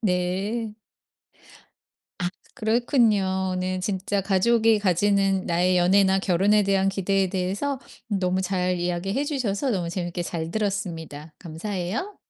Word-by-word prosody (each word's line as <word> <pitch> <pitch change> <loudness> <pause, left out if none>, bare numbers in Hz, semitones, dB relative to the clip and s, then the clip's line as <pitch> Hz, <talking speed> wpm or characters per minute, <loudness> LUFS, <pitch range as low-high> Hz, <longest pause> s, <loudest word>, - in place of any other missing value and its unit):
네. 200 +3 -1 1.5
아 175 - 0 0.3
그렇군요. 215 -5 +1
오늘 185 0 -2
진짜 195 +1 -1
가족이 220 +3 +3
가지는 195 0 +2
나의 180 +2 +2
연애나 190 +2 +4
결혼에 195 +3 +3
대한 195 -1 +2
기대에 195 0 +1
대해서 195 +9 -2 0.3
너무 185 -3 0
잘 185 -1 0
이야기해 180 +9 -1
주셔서 260 -4 -1
너무 180 -6 -1
재밌게 175 -1 -3
잘 165 -1 -4
들었습니다. 170 -7 -4
감사해요. 185 - -4
190 Hz, 280 characters per minute, -24 LUFS, 180-210 Hz, 1.5 s, 연애나